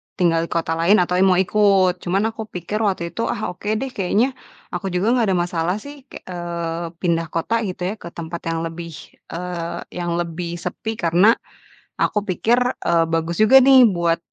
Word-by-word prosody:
tinggal 170 -2 +2
di - - -28
kota 165 -1 0
lain, 185 +6 +5
atau 180 +1 -1
ya - - +5
mau 185 - +4
ikut. 190 -1 +3
Cuman 190 +4 0
aku 220 -1 -7
pikir 180 +4 -4
waktu 185 -3 -1
itu, 230 - -4
ah, 215 - -2
oke 185 +3 -10
deh 265 +3 -3
kayaknya, 210 +6 +1 0.4
aku 175 +2 -4
juga 190 +5 +1
nggak 245 -3 +3
ada 190 - +2
masalah 175 +1 -1
sih 285 -1 -12
kek - - -11
eee, 170 -1 -4
pindah 165 -2 0
kota 170 +9 -1
gitu 180 0 -6
ya, 190 +3 -1
ke - - -9
tempat 170 0 -5
yang 165 0 -1
lebih, 165 0 -6 0.4
eee, 170 0 -5 0.2
yang 170 -1 -1
lebih 170 0 -3
sepi. 205 +6 -5
Karena 180 +8 +5 0.6
aku 210 -1 +1
pikir, 215 +5 +1 0.3
eee, 170 -1 +4
bagus 165 +1 -1
juga 265 +5 +8
nih 260 -1 +7
buat, 170 -6 +2
180 Hz, 190 wpm, -21 LUFS, 170-210 Hz, 0.6 s, juga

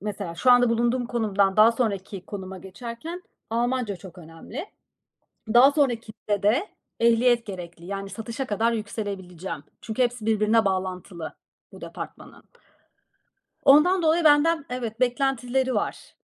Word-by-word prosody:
mesela 200 -4 -5
şu 250 +9 +3
anda 245 -1 +5
bulunduğum 240 +1 +1
konumdan 205 -5 +1
daha 220 +2 +7
sonraki 200 -5 -3
konuma 190 -2 -7
geçerken 235 - -8 0.3
Almanca 235 -3 -1
çok 185 -1 -13
önemli. 170 - -9 0.9
Daha 255 +3 +8
sonrakinde 230 -7 -1
de 240 - +2 0.3
ehliyet 235 0 +3
gerekli. 175 -3 -8
Yani 195 0 -5
satışa 230 +6 -5
kadar 225 +2 +1
yükselebileceğim. 195 -7 -5 0.2
Çünkü 225 +3 -2
hepsi 240 -3 -1
birbirine 220 0 +3
bağlantılı 185 -3 -3 0.4
bu - - -12
departmanın. - - -9 1.2
Ondan 305 +7 +6
dolayı 330 +1 +3
benden 300 0 +4
evet 240 -3 -4
beklentileri 260 0 0
var. - - -3
225 Hz, 120 wpm, -25 LUFS, 195-250 Hz, 1.2 s, Daha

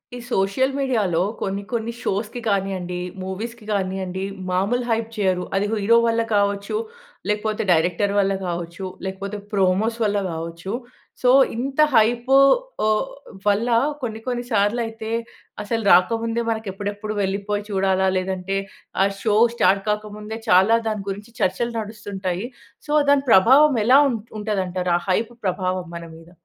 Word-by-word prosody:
ఈ - - -6
సోషల్ 200 +8 +1
మీడియాలో 220 -11 +1 0.2
కొన్ని, 195 +1 -2
కొన్ని 230 0 -1
షోస్‌కి 210 +4 -2
కానియండి, 190 -3 -1 0.2
మూవీస్‌కి 215 +4 -6
కానియండి, 190 -2 -2 0.3
మాములు 200 +7 +1
హైప్ 225 0 0
చెయ్యరు. 185 -3 +1
అది 195 +1 +1
హీరో 220 +2 +4
వల్ల 230 0 +2
కావచ్చు, 200 - 0 0.5
లేకపోతే 210 +1 -1
డైరెక్టర్ 175 +4 +2
వల్ల 195 0 +2
కావచ్చు, 170 +1 -4 0.2
లేకపోతే 195 +2 -4 0.2
ప్రోమోస్ 200 +4 +2
వల్ల 205 0 +1
కావచ్చు. 165 +3 -6 0.5
సో 250 - +4 0.3
ఇంత 265 +4 -4 0.2
హైపు 240 +4 +3 0.5
ఓహ్! 215 +4 +1 0.4
వల్ల 210 +4 +2 0.3
కొన్ని, 220 -3 -4
కొన్ని 245 -1 -1
సార్లు 210 +2 +2
అయితే 225 0 -7 0.5
అసలు 225 +2 -2
రాకముందే 230 +5 +2
మనకి 220 -1 -4
ఎప్పుడెప్పుడు 205 +2 -4
వెళ్ళిపోయి 200 +2 -2
చూడాలా? 190 -1 +1
లేదంటే 190 +1 -2 0.5
ఆ - - +4 0.2
షో 215 -2 +1 0.2
స్టార్ట్ 195 -2 +3
కాకముందే 210 +1 -4
చాలా 200 +4 +6
దాని 210 -2 -3
గురించి 205 +4 -7
చర్చలు 235 +6 0
నడుస్తుంటాయి. 200 -2 -4 0.4
సో - - -4 0.2
దాని 280 -1 +3
ప్రభావం 265 +9 +6
ఎలా 260 +4 +7
ఉం 245 - -1 0.2
ఉంటదంటారు? 185 -4 -1
ఆ - - -11
హైప్ 225 +5 0
ప్రభావం 185 -1 -1
మన 170 - -8
మీద? 165 +1 -15
205 Hz, 135 wpm, -22 LUFS, 190-225 Hz, 0.5 s, ఎలా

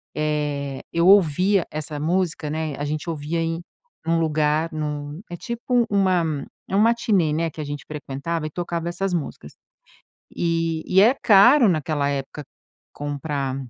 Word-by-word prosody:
eh, 145 -2 -2
eu 170 +2 +2
ouvia 190 0 +4
essa 150 -1 -5
música, 165 -1 -1
né, 155 -1 -2
a 145 - -2
gente 155 +3 -3
ouvia 160 +1 -3
em 165 +1 -2 0.4
num 165 0 +1
lugar 155 0 +1
num 150 +1 -4
é 175 - -5
tipo 235 +2 0
uma 175 -7 +1 0.2
é 195 - -3
uma 210 +2 +5
matinê, 220 -9 +2
né, 165 +2 0
que 155 - -7
a - - -3
gente 145 0 -6
frequentava 155 +2 -4
e - - -6
tocava 170 +1 -3
essas 190 +1 -2
músicas. 165 -4 -5 0.8
E 165 -1 -1
e 190 - +4
é 235 +6 +6
caro 225 +3 +7
naquela 150 -2 0
época 140 +1 -5 0.5
comprar 145 -2 -3
160 Hz, 155 wpm, -23 LUFS, 150-180 Hz, 0.8 s, caro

